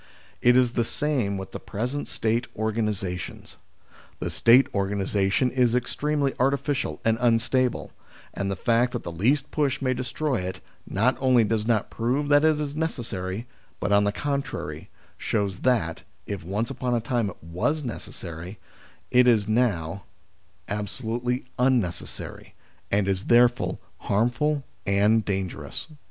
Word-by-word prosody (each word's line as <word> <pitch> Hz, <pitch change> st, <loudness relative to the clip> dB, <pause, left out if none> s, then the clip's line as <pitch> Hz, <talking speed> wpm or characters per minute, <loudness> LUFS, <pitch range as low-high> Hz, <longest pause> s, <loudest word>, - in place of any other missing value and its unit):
It 125 Hz, +1 st, +6 dB
is 125 Hz, -2 st, +4 dB
the 120 Hz, -, +2 dB
same 120 Hz, -6 st, -1 dB
with 95 Hz, 0 st, -7 dB
the -, -, -6 dB
present 125 Hz, +7 st, -3 dB
State 115 Hz, +3 st, 0 dB
organisations. 105 Hz, -4 st, -3 dB, 0.6 s
The -, -, -3 dB
State 125 Hz, +4 st, +6 dB
organi 100 Hz, 0 st, -1 dB
sation 100 Hz, +6 st, +1 dB
is 125 Hz, -2 st, +3 dB
extremely 140 Hz, +3 st, 0 dB
artificial 140 Hz, +1 st, 0 dB
and 115 Hz, 0 st, +2 dB
unstable, 120 Hz, +2 st, +2 dB, 0.4 s
and 100 Hz, 0 st, -2 dB
the 95 Hz, -, -1 dB
fact 120 Hz, +5 st, +2 dB
that -, -, -3 dB
the 85 Hz, -, -5 dB
least 130 Hz, -, +1 dB
push 145 Hz, -3 st, 0 dB
may 130 Hz, -2 st, +1 dB
destroy 130 Hz, +2 st, -1 dB
it, 90 Hz, -1 st, -4 dB, 0.3 s
not 115 Hz, +7 st, +2 dB
only 130 Hz, -3 st, +4 dB
does 110 Hz, 0 st, 0 dB
not 115 Hz, -3 st, +1 dB
prove 130 Hz, +6 st, 0 dB
that 145 Hz, 0 st, +5 dB
it 155 Hz, -1 st, +4 dB
is 145 Hz, -1 st, -3 dB
necessary, 115 Hz, -, -3 dB, 0.3 s
but -, -, -1 dB
on 100 Hz, 0 st, +5 dB
the 100 Hz, -, +2 dB
contrary 140 Hz, +4 st, -3 dB, 0.3 s
shows 100 Hz, -3 st, -1 dB
that, 110 Hz, -11 st, +1 dB, 0.2 s
if 100 Hz, -4 st, -5 dB
once 105 Hz, +8 st, -2 dB
upon 125 Hz, -1 st, -1 dB
a -, -, +2 dB
time 115 Hz, -2 st, 0 dB
it 90 Hz, -, -13 dB
was 90 Hz, -, -1 dB
necessary, 90 Hz, -, -7 dB, 0.5 s
it 125 Hz, 0 st, +6 dB
is 110 Hz, -4 st, +4 dB
now 100 Hz, -6 st, 0 dB, 0.6 s
absolutely 120 Hz, +4 st, -2 dB
unnecessary, 125 Hz, -10 st, -1 dB, 0.3 s
and 100 Hz, -1 st, +1 dB
is 95 Hz, 0 st, 0 dB
therefore 120 Hz, 0 st, +4 dB, 0.2 s
harmful 125 Hz, +8 st, +1 dB, 0.2 s
and 105 Hz, +3 st, +4 dB
dangerous.. 95 Hz, -3 st, -1 dB
WHAT -, -, -8 dB
ARE -, -, -12 dB
GOVERNMENTS? 150 Hz, -2 st, -17 dB
115 Hz, 150 wpm, -26 LUFS, 100-130 Hz, 0.6 s, It